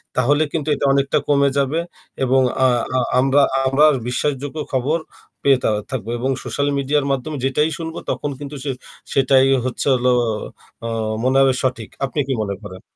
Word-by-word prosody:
তাহলে 145 +5 +3
কিন্তু 155 -2 -3
এটা 140 - -2
অনেকটা 140 0 +2
কমে 140 -1 +3
যাবে 140 +4 +1 0.4
এবং 130 +1 +3 0.2
আ - - +6 0.3
আ - - +3 0.2
আমরা 135 +2 +4 0.2
আবার 145 +4 +5 0.2
বিশ্বাসযোগ্য 145 +3 -2 0.2
খবর 135 +5 +1 0.5
পেয়ে 135 -2 +5
থা - - +2 0.2
থাকবো 120 -3 -4
এবং 130 +3 0
সোশ্যাল 140 0 -1
মিডিয়ার 140 +1 +1
মাধ্যমে 135 +3 -2
যেটাই 150 +4 +1
শুনবো 165 0 -5
তখন 145 - -2
কিন্তু 145 0 -7
সে 140 - -1 0.4
সেটাই 135 0 +4 0.2
হচ্ছে 130 - -2
হলো 125 0 +2 0.7
অ - - -2 0.4
মনে 130 +1 +2
হবে 135 -1 +4
সঠিক 120 -4 -2 0.2
আপনি 135 +3 -4
কি 135 - 0
মনে 100 -2 -2
করেন? 95 -2 -9
135 Hz, 165 wpm, -20 LUFS, 130-145 Hz, 0.7 s, আ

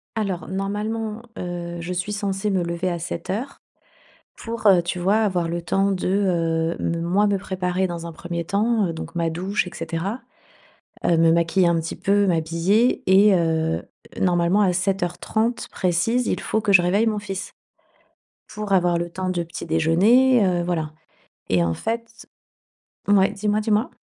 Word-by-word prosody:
Alors 195 -7 -2
normalement, 210 +3 -3 0.2
heu, 175 -1 -5
je 175 +2 -4
suis 180 +3 -3
censée 200 0 -2
me 190 -3 +1
lever 170 +2 -2
à 175 - -2
7:00 195 +10 -5 0.8
pour, 230 -1 -3
heu, 185 -3 +6
tu 175 +1 -4
vois, 195 +4 +2
avoir 185 -6 +1
le 170 +1 -3
temps 195 +4 +1
de, 185 -2 -2
heu, 170 -4 0
me 170 0 -1
moi 190 +5 +2
me 200 -1 +1
préparer 185 -1 -2
dans 170 -1 -6
un 170 - -6
1er 170 +1 -5
temps. 210 +2 +1
Heu, 165 - -4
donc 165 - -8
ma 165 -1 0
douche 185 +4 -2
et - - -8
cetera, 170 +8 -4 0.9
heu, 170 - +3
me 165 0 +4
maquiller 170 +2 +2
un 170 - +2
petit 160 - -5
peu, 200 0 +2
m'habiller 170 +7 +1
et 195 +2 +6
heu, 160 -1 0 0.4
normalement 175 +2 +2
à 190 -3 +3
7:30 195 +5 -1
précise, 195 +7 0
il - - -1
faut 220 - -1
que 205 -2 +1
je 185 - +7
réveille 200 +6 +2
mon 215 -1 0
fils, 195 -2 -6 1.0
pour 210 -1 -5
avoir 175 -2 +3
le 175 0 -3
temps 185 +2 -4
de 175 -2 -1
petit 170 - -8
déjeuner, 200 +10 +4
heu, 175 -2 +1
voilà 160 -3 -2 0.6
et 90 -2 +3
en 85 - 0
fait 230 - -5 0.8
mouais, 195 -1 +4
dis-moi, 210 +1 0
dis-moi? 215 +2 +1
185 Hz, 170 wpm, -22 LUFS, 170-205 Hz, 1.0 s, je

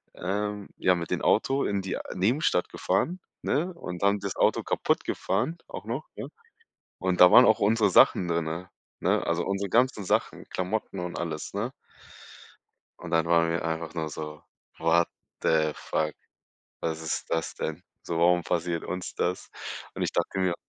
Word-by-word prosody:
ähm, 105 +2 -3
ja, 90 - +3
mit 85 -1 -5
dem - - 0
Auto 135 +1 +2
in 100 -1 0
die 95 - -2 0.2
Nebenstadt 95 - +2
gefahren, 180 +3 0 0.2
ne, 170 +6 0
und 90 - -7
dann 100 +1 +3
das 100 -2 -4
Auto - - +3
kaputtgefahren, 165 +2 0
auch - - -7
noch, - - -3
ja? - - -6 0.7
Und 90 -1 0
da 90 0 +10
waren 125 - +9
auch 110 - +5
unsere 105 0 +3
Sachen 90 0 +5
drinne, 85 +1 -2 0.3
ne, - - +2
also, 85 +1 0
unsere 100 +1 -1
ganzen 120 -2 +2
Sachen, - - 0
Klamotten 95 +2 -3
und 90 0 -4
alles, 80 -3 -4
ne? 110 +6 -2 1.3
Und 85 - -7
dann 80 0 +3
waren 85 0 +3
wir 85 0 -1
einfach 80 0 -3
nur 80 -2 -2
so: 75 0 -7 0.4
„What 80 +1 +3 0.3
the 80 -1 +3
fuck, 75 0 -2 0.7
was 80 -1 -2
ist 80 - -3
das 80 -1 -1
denn 80 +3 -4 0.2
so, 85 -1 -2
warum 85 0 +4
passiert 85 0 -1
uns 90 0 -5
das?“ 90 +1 -2 0.5
Und - - -1
ich - - -1
dachte - - -1
mir 90 -2 +1
90 Hz, 165 wpm, -27 LUFS, 85-100 Hz, 1.3 s, da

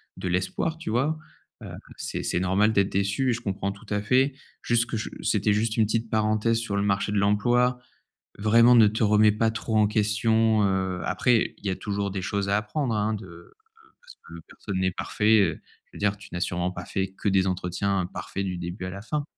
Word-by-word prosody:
de - - -5
l'espoir 95 - -1
tu 165 - -6
vois? 145 +7 +1 0.4
Heu, - - -8 0.3
c'est - - -4
c'est - - 0
normal 95 +4 +2
d'être 100 -2 +1
déçue 100 +7 0
et - - +1
je 120 - -5
comprends 100 -2 -3
tout 100 +2 -16
à 105 - 0
fait. 130 +5 +2 0.3
Juste 120 0 +2
que, 115 - -5 0.3
c'était 105 0 +1
juste 110 +1 0
une 110 -2 +3
petite 115 +1 -1
parenthèse 110 +1 +1
sur 110 -3 -3
le 100 - +1
marché 100 +1 0
de 105 - 0
l'emploi. 120 +5 +2 0.6
Vraiment 115 +4 +5
ne 110 -3 +7
te 110 +2 -1
remet 105 0 +5
pas 110 +1 +1
trop 110 0 -2
en 105 -1 +4
question, 110 +1 +2
heu, 95 -2 -1
après 120 -3 +1
il - - -18
y - - +1
a 95 - -1
toujours 100 -1 -3
des 95 -1 -4
choses 100 +1 -2
à 100 - +3
apprendre 115 +3 -2
hein 105 +1 0
de 110 - -10 0.5
parce - - -15
que - - -12
personne 95 -2 -5
n'est 95 0 +1
parfait, 110 +4 +2
heu, 85 -5 -1 0.2
je - - -39
veux - - -10
dire 105 0 0
tu 100 -1 -14
n'as 85 - -3
sûrement 90 0 -1
pas 90 0 -7
fait 95 0 -3
que 100 - 0
des 95 0 +2
entretiens 90 +1 -1
parfaits 100 0 -4
du 90 -2 -3
début 90 +2 -6
à - - -4
la 100 +2 -8
fin. 145 +6 -3
105 Hz, 220 wpm, -25 LUFS, 95-115 Hz, 0.6 s, ne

